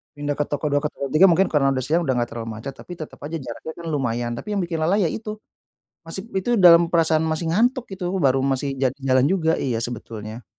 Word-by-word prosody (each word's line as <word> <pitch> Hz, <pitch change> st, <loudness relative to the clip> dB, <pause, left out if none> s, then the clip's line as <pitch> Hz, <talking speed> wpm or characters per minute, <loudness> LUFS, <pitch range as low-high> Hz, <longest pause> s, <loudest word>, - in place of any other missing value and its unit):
Pindah 145 Hz, 0 st, -2 dB
ke 150 Hz, -, 0 dB
toko 145 Hz, +1 st, -3 dB
dua 145 Hz, -1 st, +1 dB
ke 150 Hz, -, 0 dB
toko 140 Hz, -, -5 dB
tiga 160 Hz, +5 st, +7 dB
mungkin 180 Hz, +3 st, +4 dB
karena 140 Hz, -3 st, +2 dB
udah 130 Hz, -1 st, -1 dB
siang, 165 Hz, +5 st, +2 dB
udah 135 Hz, -5 st, +1 dB
nggak 120 Hz, 0 st, 0 dB
terlalu 115 Hz, -1 st, -5 dB
macet, 135 Hz, +4 st, -6 dB
tapi -, -, -13 dB
tetap 155 Hz, -, -8 dB
aja 160 Hz, +3 st, -4 dB
jaraknya 130 Hz, +4 st, -7 dB
kan 170 Hz, -, -9 dB
lumayan. 120 Hz, -3 st, -1 dB
Tapi 120 Hz, -, -9 dB
yang 195 Hz, -, +1 dB
bikin 165 Hz, -2 st, -3 dB
lelah, 175 Hz, +6 st, +2 dB
ya, 195 Hz, -5 st, +2 dB
itu, 215 Hz, +5 st, -5 dB, 0.7 s
masih 165 Hz, +4 st, -4 dB, 0.2 s
itu 190 Hz, +6 st, -2 dB
dalam 170 Hz, -1 st, +9 dB
perasaan 160 Hz, -1 st, +3 dB
masih 160 Hz, +1 st, -1 dB
ngantuk 245 Hz, +7 st, +2 dB
itu, 190 Hz, -2 st, -6 dB, 0.2 s
baru 135 Hz, -1 st, +3 dB
masih 135 Hz, 0 st, -1 dB
ja-jalan 130 Hz, 0 st, +1 dB
juga, 165 Hz, 0 st, +1 dB
iya, 120 Hz, -4 st, -1 dB
sebetulnya. 115 Hz, -1 st, -6 dB
150 Hz, 225 wpm, -22 LUFS, 130-170 Hz, 0.7 s, dalam